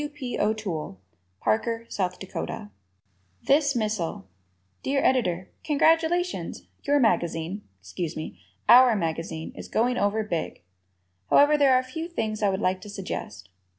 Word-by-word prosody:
W. 295 Hz, -, -3 dB
P. 270 Hz, -4 st, -5 dB
O'Toole, 200 Hz, -, -2 dB, 0.4 s
Parker, 230 Hz, -, 0 dB
S. 185 Hz, -2 st, -1 dB
Dak. 185 Hz, -, -6 dB, 0.7 s
"This 285 Hz, -1 st, +3 dB
Missile" 210 Hz, -, -2 dB, 0.6 s
Dear 275 Hz, +1 st, 0 dB
Editor: 185 Hz, -9 st, +1 dB
Congratulations! 325 Hz, +4 st, +1 dB, 0.2 s
Your 290 Hz, 0 st, +2 dB
magazine 175 Hz, -3 st, 0 dB, 0.2 s
excuse 150 Hz, -, -5 dB
me, 155 Hz, -, -6 dB, 0.3 s
"our" 245 Hz, -1 st, +8 dB
magazine 165 Hz, -2 st, -3 dB
is -, -, -8 dB
going 245 Hz, +2 st, +1 dB
over 205 Hz, +2 st, +1 dB
big! 170 Hz, -, -4 dB, 0.7 s
However, 290 Hz, +1 st, +6 dB
there 280 Hz, -3 st, +5 dB
are -, -, +5 dB
a -, -, -3 dB
few 320 Hz, +6 st, -5 dB
things 220 Hz, -11 st, -3 dB
I 205 Hz, -, +3 dB
would 190 Hz, +1 st, -1 dB
like 185 Hz, -1 st, 0 dB
to 210 Hz, -, -10 dB
suggest. 105 Hz, -, -6 dB
215 Hz, 140 wpm, -26 LUFS, 175-265 Hz, 0.7 s, our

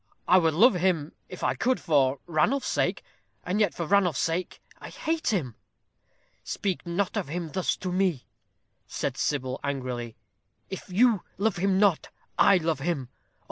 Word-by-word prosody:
I 185 Hz, +1 st, +6 dB
would 160 Hz, -3 st, +1 dB
love 230 Hz, +8 st, +6 dB
him, 175 Hz, -4 st, 0 dB, 0.2 s
if 180 Hz, -, -9 dB
I -, -, +2 dB
could, 255 Hz, +1 st, 0 dB
for 140 Hz, -5 st, +2 dB
Ranulph's 175 Hz, -, +1 dB
sake; -, -, 0 dB, 0.4 s
and 185 Hz, +4 st, -1 dB
yet 205 Hz, -5 st, +2 dB
for 170 Hz, -, -3 dB
Ranulph's 180 Hz, -4 st, +2 dB
sake 170 Hz, +2 st, -2 dB, 0.2 s
I -, -, -9 dB
hate 320 Hz, 0 st, -3 dB
him." 170 Hz, -, 0 dB, 0.9 s
"Speak 190 Hz, -3 st, -3 dB
not 180 Hz, +3 st, -1 dB
of -, -, -2 dB
him 165 Hz, +1 st, -4 dB
thus 185 Hz, +1 st, 0 dB
to 185 Hz, -, -4 dB
me," 180 Hz, -7 st, 0 dB, 0.6 s
said -, -, -3 dB
Sybil, 130 Hz, -2 st, -2 dB
angrily. 125 Hz, -4 st, -4 dB, 0.6 s
"If 190 Hz, -, -7 dB
you 215 Hz, +1 st, +3 dB, 0.2 s
love 205 Hz, -1 st, 0 dB
him 190 Hz, +1 st, +1 dB
not, 200 Hz, -6 st, +2 dB, 0.3 s
I 200 Hz, -, +5 dB
love 160 Hz, -4 st, -1 dB
him. 140 Hz, -4 st, -2 dB
Oh! -, -, -43 dB
175 Hz, 165 wpm, -27 LUFS, 150-195 Hz, 0.9 s, I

